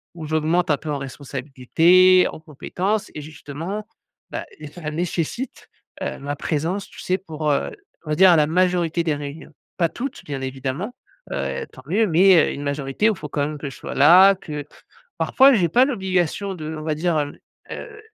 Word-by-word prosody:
où 160 -2 -7
j'augmente 160 +2 +1
un 145 - +3
peu 150 +1 -6
en 140 - -2
responsabilités, 145 +7 +3
en - - -10
compétences 180 +7 -3
et 150 - -5
justement, 160 +7 -7 0.4
bah, - - -5 0.3
ça 155 -3 -5
nécessite, 175 - -3 0.4
heu, - - -3
ma 145 +1 -4
présence, 165 +7 -2
tu - - -15
sais 185 +1 0
pour, 155 -5 -4
heu, - - 0 0.3
on - - -8
va - - +2
dire, 185 0 +7
la 150 -1 +4
majorité 175 -1 +1
des 155 -3 0
réunions. 145 +2 -8 0.3
Pas 170 -3 +2
toutes 270 +2 -6
bien 140 -2 -5
évidemment, 135 - -4 0.4
heu, 70 -1 -3
tant 130 - -12
mieux, 215 +6 +2
mais, 185 +2 +5 0.2
heu, - - -4
une 140 - -6
majorité 140 +8 0
où 215 - 0
faut 150 - -7
quand 145 0 -3
même 150 -1 -5
que 140 -1 -5
je - - -11
sois - - -7
là, 185 +7 +7
que 150 -5 -7 0.5
parfois 270 +1 +5
j'ai 180 -8 +3
pas 245 +11 +5
l'obligation 190 - -1
d'on 155 -2 -6
va 155 -1 -1
dire, 165 0 0
hem, 145 -1 -3 0.3
heu, - - -8
160 Hz, 185 wpm, -22 LUFS, 145-185 Hz, 0.5 s, dire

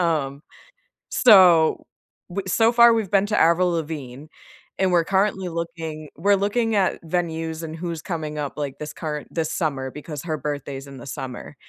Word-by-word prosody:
Um, 150 -4 -1 0.7
so, 180 -8 +6 0.5
w 200 +2 -3
so 225 +4 +3
far 235 0 +7
we've 220 -5 -1
been 200 0 +4
to 210 - 0
Avril 175 +2 +4
Lavigne, 150 -4 -5 0.5
and 190 -1 +2
we're 170 -2 +4
currently 190 -1 0
looking 165 -2 -5
we're 200 +6 +3
looking 220 +3 0
at 190 -2 +1
venues 165 -1 -2
and 160 0 -6
who's 170 -1 -5
coming 155 -4 -4
up, 145 -2 -4
like, 140 -2 -4
this 150 - -5
current 150 -2 -5
this 160 -2 -1
summer, 135 -5 -2
because 150 -1 -7
her 155 -2 -2
birthday's 140 -1 -5
in 140 - -10
the 120 - -11
summer, 130 +1 -7
165 Hz, 170 wpm, -23 LUFS, 150-185 Hz, 0.7 s, far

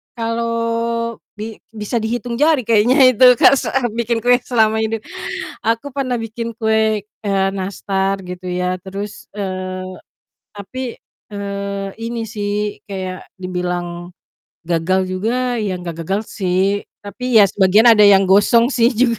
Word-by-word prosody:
kalau, 230 0 -1 0.2
bi 220 0 -5 0.2
bisa 215 +2 -5
dihitung 235 +1 -2
jari 300 -3 +3
kayaknya 245 +5 +5
itu 255 +1 +5
Kak - - +7
se - - -4
eee, 245 -3 0
bikin 235 -1 -1
kue 245 +1 +5
selama 220 -3 +1
ini. 220 0 0 0.7
Aku 230 +5 0
pernah 255 -3 -2
bikin 230 +1 -5
kue, 220 -1 +1
eee, 195 -1 -2
nastar 195 0 -2
gitu 180 0 -8
ya 180 0 -1
terus 200 +2 -7
eee, 185 -2 -4 0.7
tapi, 240 +5 -6 0.4
eee, 200 -1 -4
ini 230 0 -3
sih, 210 -1 -3
kayak 185 -2 -6
dibilang 180 -1 -4 0.6
gagal 175 +2 +1
juga 240 +7 -1
ya 205 -3 -1
nggak 170 -2 -6
gagal 195 +5 0
sih, 195 +1 0 0.2
tapi 205 +5 -8 0.2
ya - - +8
sebagian 200 +5 +4
ada 215 -2 +7
yang 195 -2 +6
gosong 230 +5 +5
sih 240 -3 +2
juga. 235 -1 +1
210 Hz, 140 wpm, -18 LUFS, 190-230 Hz, 0.7 s, ya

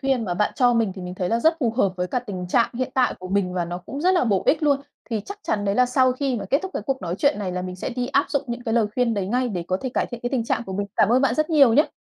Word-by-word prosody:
khuyên 265 -4 0
mà 175 -2 -2
bạn 210 +3 0
cho 245 -2 +4
mình 225 -5 +1
thì 190 - -8
mình 180 0 -6
thấy 180 -1 -2
là 230 - +1
rất 320 +5 +3
phù 235 -3 +2
hợp 200 -5 +1
với 180 0 -1
cả 250 - -1
tình 190 -6 -6
trạng 235 +4 +2
hiện 255 +1 -2
tại 255 -2 +2
của 185 - -7
mình 195 -2 0
và 175 - 0
nó 175 +1 -5
cũng 275 +10 -7
rất 365 +4 +3
là 350 - +3
bổ 200 -5 +1
ích 310 +1 +3
luôn. 285 -2 +3 0.3
Thì 220 -2 -1
chắc 400 - -7
chắn 205 -1 -1
đấy 200 0 +1
là 250 +1 +4
sau 255 0 +3
khi 260 -1 -1
mà 200 - -4
kết 280 - +4
thúc 380 - -5
cái - - -2
cuộc 270 -1 -2
nói 170 0 -2
chuyện 285 -3 +2
này 190 -3 -3
là 180 0 -3
mình 185 0 -6
sẽ - - -4
đi 245 0 -2
áp 280 +1 +2
dụng 280 - 0
những 240 +1 -5
cái 225 0 -1
lời 225 -3 +3
khuyên 245 -2 +1
đấy 200 -3 -2
ngay, 245 +4 0
để 180 -5 -4
có 185 - +1
thể 260 - -3
cải - - +1
thiện 240 -2 -8
cái 245 - -2
tình 245 -4 0
trạng 235 - -1
của 190 - -6
mình. 200 +1 -2
Cảm - - +4
ơn 255 +3 +3
bạn 250 -3 +2
rất 310 +3 0
nhiều 280 -7 +6
nhá. 295 - +3
235 Hz, 355 wpm, -23 LUFS, 195-265 Hz, 0.3 s, nhiều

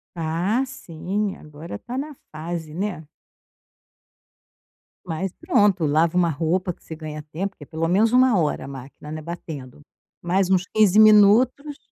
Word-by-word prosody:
Ah, 170 +9 0
sim, 195 +2 -4
agora 150 -4 -10
está 240 - -7
na 290 +1 -5 0.2
fase, 160 0 -6
né. 175 -4 -4 2.0
Mas 180 +2 -3
pronto, 205 - +2
lava 160 +4 +2
uma 170 -2 +3
roupa 170 +4 0
que - - -31
você 160 - -8
ganha 155 -1 -7
tempo, 195 +5 -3
que - - -11
é - - -11
pelo 165 0 -2
menos 215 +6 +3
1 255 -4 +5
hora 150 -3 -1
a - - -8
máquina 135 +2 -10
não 155 - -5
é, - - -9
batendo, 150 -5 -8 0.4
mais 185 +2 +1
uns 185 -1 +2
15 210 -2 +3
minutos, 220 +7 +5
175 Hz, 155 wpm, -23 LUFS, 155-210 Hz, 2.0 s, 1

